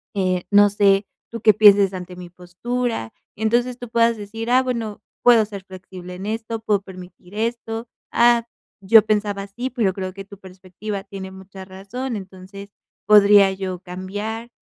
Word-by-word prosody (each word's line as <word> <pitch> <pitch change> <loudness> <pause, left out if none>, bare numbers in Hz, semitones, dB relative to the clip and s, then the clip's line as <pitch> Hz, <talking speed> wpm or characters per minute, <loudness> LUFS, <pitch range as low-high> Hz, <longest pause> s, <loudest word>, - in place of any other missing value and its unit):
eh, 185 -2 0
no 205 0 +6
sé, 200 0 +3 0.3
tú 230 - -7
qué 215 -1 +6
pienses 200 -2 +6
ante 180 -1 -7
mi 180 -1 -9
postura". 180 - -4 0.2
Entonces, 240 +3 0
tú 245 - -7
puedas 230 0 +2
decir: 225 +3 -6
"Ah, 255 +1 +5
bueno, 230 -5 -4 0.2
puedo 240 -2 +6
ser 200 -2 -9
flexible 185 -1 -10
en 190 +2 -8
esto, 225 +1 -4
puedo 205 -3 +1
permitir 185 0 -13
esto. 225 +1 -3 0.3
Ah, 235 0 +4 0.3
yo 220 +3 +7
pensaba 210 -2 -1
así, 235 +6 -5
pero 230 -7 0
creo 185 -1 -5
que 195 +1 -8
tu 200 0 -13
perspectiva 190 +2 -8
tiene 190 -2 -8
mucha 190 0 -11
razón. 200 +7 -6
Entonces, 195 +1 -11 0.4
podría 205 -2 +6
yo 190 -1 -5
cambiar", 205 +6 -6
200 Hz, 160 wpm, -21 LUFS, 190-225 Hz, 0.4 s, yo